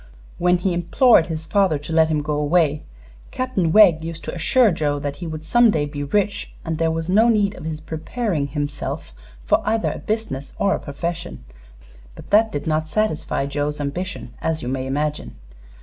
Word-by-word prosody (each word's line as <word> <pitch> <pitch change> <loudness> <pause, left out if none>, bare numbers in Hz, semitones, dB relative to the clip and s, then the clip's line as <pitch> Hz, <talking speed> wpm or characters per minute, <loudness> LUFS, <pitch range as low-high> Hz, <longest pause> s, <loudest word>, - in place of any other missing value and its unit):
"When 180 +1 +3
he 180 +1 -1
implored 175 +3 +4
his 160 -2 -5
father 190 -4 +2
to 145 +3 -7
let 160 0 +5
him 150 -2 0
go 150 0 -2
away, 150 0 +2 0.5
Captain 225 -10 -1
Wegg 175 -6 +6
used 165 0 -6
to - - -5
assure 230 +6 +3
Joe 145 -3 -1
that 145 0 -4
he 175 - -6
would 155 -1 -6
some 240 +7 +4
day 155 -8 +1
be 145 -1 -5
rich, 205 +7 -1
and 160 -1 -3
there 165 0 +2
was 165 0 -2
no 215 +6 +4
need 205 -3 +2
of 155 - -10
his 155 -1 -4
preparing 160 - -3
himself 145 - -4 0.3
for - - +2
either 220 +1 0
a - - -6
business 210 -11 -4
or 200 -1 +2
a - - -2
profession; 170 - -5 0.7
but - - -13
that 220 +2 +5
did 145 - -4
not 155 0 0
satisfy 155 -5 -1
Joe's 145 +1 -2
ambition, 145 -2 -4
as 160 -1 -1
you - - -4
may 130 0 -2
imagine. 150 - -2
160 Hz, 190 wpm, -21 LUFS, 145-195 Hz, 0.7 s, Wegg